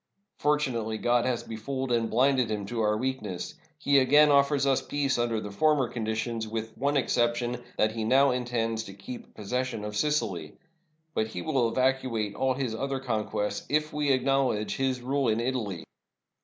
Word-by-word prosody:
Fortunately 125 -7 0
God 120 +1 +2
has 125 -2 -1
befooled 130 +4 -4
and 115 -1 +1
blinded 130 0 +3
him 105 -2 -2
to 115 +3 -3
our 105 0 +2
weakness. 110 -7 -3 0.2
He 140 -2 +4
again 145 +3 +6
offers 140 0 +3
us 135 -1 +2
peace 140 -3 -1
under 115 -2 0
the 105 -1 -6
former 145 +4 +2
conditions, 110 0 -2
with 110 0 -4
the - - -22
one 140 +2 +1
exception 120 -1 0 0.2
that 110 - +3
he 110 0 -3
now 135 +4 +4
intends 115 -3 -1
to 95 - -10
keep 100 +5 -9
possession 125 +1 -3
of 105 0 -5
Sicily. 105 - -1 0.6
But 110 - 0
he 110 - -6
will 130 -8 +1
evacu 130 -2 +1
ate 105 -1 -2
all 130 +3 0
his 130 -4 -2
other 135 +3 -2
conquests 105 -4 -2
if 150 +1 0
we 150 -1 -1
will 135 - +5
acknowledge 130 -5 +1
his 130 -2 0
rule 135 +1 0
in 110 0 +2
Italy. 115 -9 -2
120 Hz, 180 wpm, -28 LUFS, 110-135 Hz, 0.6 s, again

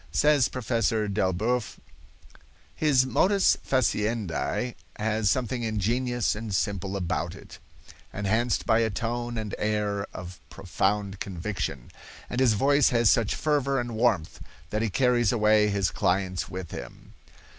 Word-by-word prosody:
Says 145 - +4
Professor 115 -3 0
Delboeuf: 105 +4 -1 1.0
"His 140 -4 +3
modus 190 - +3
faciendi 115 -1 -1 0.2
has 110 -1 0
something 125 +1 -1
ingenious 115 +3 0
and 105 -2 -4
simple 100 0 -1
about 85 -1 -2
it, - - -13 0.5
enhanced 110 +4 0
by 110 - +3
a 115 -1 +2
tone 120 +2 -3
and 110 -2 -4
air 105 -1 -1
of 90 0 -9
profound 95 +1 -2
conviction; 90 - -4 0.4
and 125 - -2
his 125 -4 +4
voice 140 +6 +3
has 115 -4 +4
such 115 -4 +1
fervor 140 -3 +1
and 120 -1 -4
warmth 110 -8 0 0.3
that 105 - -1
he 115 - 0
carries 120 0 +2
away 105 -2 +4
his 100 -2 0
clients 95 -2 -1
with 90 -2 -7
him. - - -9
110 Hz, 130 wpm, -26 LUFS, 100-120 Hz, 1.0 s, Says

